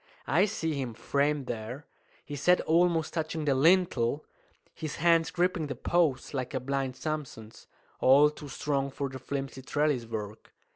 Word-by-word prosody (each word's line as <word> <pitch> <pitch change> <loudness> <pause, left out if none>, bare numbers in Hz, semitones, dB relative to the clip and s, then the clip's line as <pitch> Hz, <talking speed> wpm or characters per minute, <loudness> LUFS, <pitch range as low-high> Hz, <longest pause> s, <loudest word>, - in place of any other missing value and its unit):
I 175 +7 +3
see 165 -7 -2
him 130 -5 -4
framed 140 +4 0
there, 120 +4 -6 0.4
his 145 -1 -6
head 180 0 +6
almost 165 -1 +2
touching 160 -1 -2
the 140 - +3
lintel, 150 -3 +3 0.5
his 155 -3 -5
hands 165 0 +3
gripping 180 -3 0
the 140 - -4
posts 160 -7 0
like 130 0 -3
a - - +1
blind 135 0 -2
Samson's, 140 -9 -6 0.3
all 145 +3 +6
too 150 -1 -10
strong 140 -1 -1
for 140 0 -4
the 130 0 -8
flimsy 135 0 -5
trelliswork. 115 -7 -2
145 Hz, 150 wpm, -29 LUFS, 130-160 Hz, 0.5 s, head